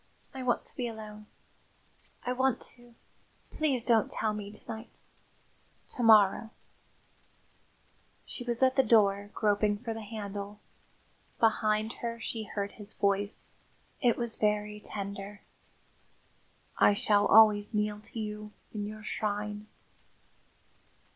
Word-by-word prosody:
I 265 Hz, -, -6 dB
want 250 Hz, -2 st, 0 dB
to -, -, -3 dB
be 245 Hz, -, -2 dB
alone. 215 Hz, -2 st, -9 dB, 1.0 s
I 250 Hz, -, 0 dB
want 260 Hz, -1 st, +1 dB, 0.2 s
to 240 Hz, -1 st, -19 dB, 0.6 s
please 275 Hz, -6 st, +1 dB
don't 230 Hz, -3 st, +3 dB
tell 215 Hz, -1 st, 0 dB
me 205 Hz, -1 st, -6 dB
to 215 Hz, -, -7 dB
night. 220 Hz, +1 st, -6 dB, 1.0 s
To 250 Hz, -, -3 dB
morrow 220 Hz, -1 st, +6 dB, 0.9 s
" -, -, -36 dB
She 245 Hz, -, -7 dB
was 240 Hz, +1 st, -1 dB
at 260 Hz, 0 st, +4 dB
the 265 Hz, -, +6 dB
door, 205 Hz, -3 st, +4 dB
groping 205 Hz, -1 st, +2 dB
for 230 Hz, +1 st, -4 dB
the 225 Hz, -, -6 dB
handle. 205 Hz, -1 st, -6 dB, 0.8 s
Behind 215 Hz, 0 st, +2 dB
her 235 Hz, -1 st, -3 dB
she 225 Hz, -1 st, -4 dB
heard 200 Hz, -1 st, -3 dB
his 210 Hz, 0 st, -9 dB
voice; 200 Hz, +1 st, -1 dB, 0.4 s
it 245 Hz, -3 st, +3 dB
was 235 Hz, -2 st, -3 dB
very 210 Hz, 0 st, 0 dB
tender. 200 Hz, 0 st, -6 dB, 1.4 s
"I 205 Hz, -, +6 dB
shall 205 Hz, 0 st, +3 dB
always 210 Hz, -1 st, +6 dB
kneel 210 Hz, 0 st, 0 dB
to 225 Hz, +1 st, -7 dB
you 210 Hz, 0 st, -5 dB, 0.2 s
in 205 Hz, -1 st, -3 dB
your 215 Hz, 0 st, -8 dB
shrine." 210 Hz, 0 st, -3 dB
215 Hz, 130 wpm, -30 LUFS, 205-230 Hz, 1.4 s, morrow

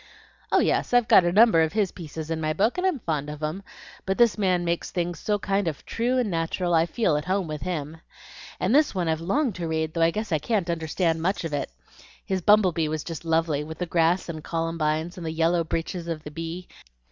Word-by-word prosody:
"Oh -, -, +4 dB
yes, -, -, +1 dB
I've 245 Hz, -2 st, +4 dB
got 180 Hz, -, +6 dB
a 175 Hz, -, +2 dB
number 210 Hz, -3 st, +6 dB
of 160 Hz, +1 st, +1 dB
his 205 Hz, -4 st, +1 dB
pieces 160 Hz, -2 st, -7 dB
in 160 Hz, -1 st, -2 dB
my 155 Hz, 0 st, 0 dB
book, 220 Hz, -, +1 dB
and 375 Hz, -, +2 dB
I'm 365 Hz, -6 st, 0 dB
fond 150 Hz, -5 st, -2 dB
of 150 Hz, +1 st, -7 dB
'em. 155 Hz, +6 st, -2 dB, 0.4 s
But 190 Hz, 0 st, -1 dB
this 235 Hz, -2 st, +4 dB
man 185 Hz, -4 st, +1 dB
makes 170 Hz, 0 st, -1 dB
things 175 Hz, -1 st, -3 dB
so 210 Hz, -1 st, 0 dB
kind 195 Hz, -1 st, -1 dB
of 155 Hz, -3 st, -4 dB
true 245 Hz, +3 st, 0 dB
and 240 Hz, -6 st, 0 dB
natural 170 Hz, +1 st, -1 dB
I 165 Hz, 0 st, +4 dB
feel 175 Hz, -7 st, +1 dB
at 150 Hz, -, -4 dB
home 190 Hz, +1 st, 0 dB
with 155 Hz, -2 st, -5 dB
HIM. 160 Hz, -3 st, -4 dB, 0.6 s
And 195 Hz, -, +1 dB
this 295 Hz, -5 st, +3 dB
one 180 Hz, -3 st, -1 dB
I've 160 Hz, 0 st, 0 dB
longed 240 Hz, -, 0 dB
to 170 Hz, -2 st, -3 dB
read, 160 Hz, -1 st, -1 dB
though 165 Hz, -, -1 dB
I 165 Hz, -, +5 dB
guess 215 Hz, +3 st, -4 dB
I 155 Hz, -, +2 dB
can't 185 Hz, 0 st, 0 dB
understand 165 Hz, 0 st, -1 dB
much 190 Hz, +3 st, 0 dB
of 165 Hz, -2 st, -4 dB
it. 145 Hz, -, -2 dB, 0.6 s
His 190 Hz, -1 st, -1 dB
'Bumble 205 Hz, 0 st, +5 dB
Bee' 160 Hz, -2 st, -1 dB
was 155 Hz, 0 st, -3 dB
just 165 Hz, -1 st, -7 dB
lovely; 160 Hz, -2 st, +1 dB
with 160 Hz, +1 st, -8 dB
the 180 Hz, -, -2 dB
grass 170 Hz, +1 st, +1 dB
and 160 Hz, -3 st, -6 dB
columbines 165 Hz, 0 st, -2 dB
and 175 Hz, -, -6 dB
the -, -, -2 dB
yellow 165 Hz, +1 st, +2 dB
breeches 165 Hz, +2 st, -4 dB
of 160 Hz, -2 st, -4 dB
the 150 Hz, -, -8 dB
bee. 165 Hz, +3 st, -6 dB
170 Hz, 240 wpm, -25 LUFS, 160-190 Hz, 0.6 s, got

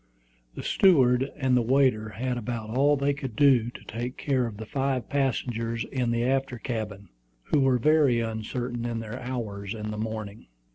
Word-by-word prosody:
The -, -, -6 dB
steward 135 Hz, -8 st, +4 dB
and 130 Hz, -3 st, +2 dB
the 125 Hz, -, +4 dB
waiter 125 Hz, -3 st, +2 dB
had 125 Hz, +5 st, -3 dB
about 115 Hz, -2 st, -4 dB
all 140 Hz, +4 st, +3 dB
they 140 Hz, +1 st, +1 dB
could 135 Hz, -5 st, -6 dB
do 125 Hz, -3 st, +4 dB
to -, -, -12 dB
take 120 Hz, +3 st, -5 dB
care 130 Hz, -4 st, 0 dB
of 105 Hz, -3 st, -8 dB
the 110 Hz, -, -6 dB
five 135 Hz, +1 st, -1 dB
passengers 115 Hz, -4 st, -1 dB
in 125 Hz, -3 st, -2 dB
the 115 Hz, 0 st, +1 dB
after 135 Hz, 0 st, 0 dB
cabin, 105 Hz, -5 st, -5 dB, 0.3 s
who 150 Hz, -, +1 dB
were 135 Hz, -2 st, +4 dB
very 145 Hz, -2 st, +4 dB
uncertain 115 Hz, +2 st, -3 dB
in 120 Hz, -1 st, -2 dB
their 115 Hz, +2 st, -6 dB
hours 110 Hz, -5 st, -4 dB
in 105 Hz, -1 st, -5 dB
the 105 Hz, -, -5 dB
morning. 110 Hz, -1 st, -5 dB
120 Hz, 180 wpm, -27 LUFS, 110-135 Hz, 0.3 s, steward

